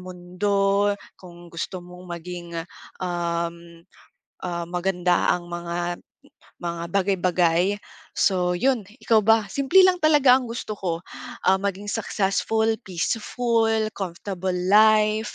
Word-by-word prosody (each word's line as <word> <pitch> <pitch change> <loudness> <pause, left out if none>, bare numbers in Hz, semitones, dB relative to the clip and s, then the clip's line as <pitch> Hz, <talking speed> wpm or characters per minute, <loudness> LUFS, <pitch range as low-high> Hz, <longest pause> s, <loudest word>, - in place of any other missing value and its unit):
mundo, 195 +3 0 0.3
kung 175 -1 -13
gusto 175 +2 -5
mong 180 +1 -12
maging, 175 0 -8 0.5
um, 170 -1 -3 0.6
ah, 175 -1 -3
maganda 180 0 +1
ang 175 -1 -8
mga 175 0 -3
m - - -26 0.6
mga 170 -1 -3
bagay-bagay. 185 -1 +2 0.4
So 180 -2 +2
'yon, 250 +1 +1 0.2
ikaw 225 -2 +4
ba? 225 0 +4
Simple 280 - +4
lang 370 -1 +4
talaga 290 -5 +6
ang 255 - -6
gusto 230 -2 -5
ko, 170 -2 -3 0.4
ah, 190 0 +5
maging 200 +1 -3
successful, 220 +1 0 0.2
peaceful, 225 +4 0
comfortable 190 0 -4
life. 215 +3 +3
190 Hz, 115 wpm, -24 LUFS, 175-215 Hz, 0.6 s, talaga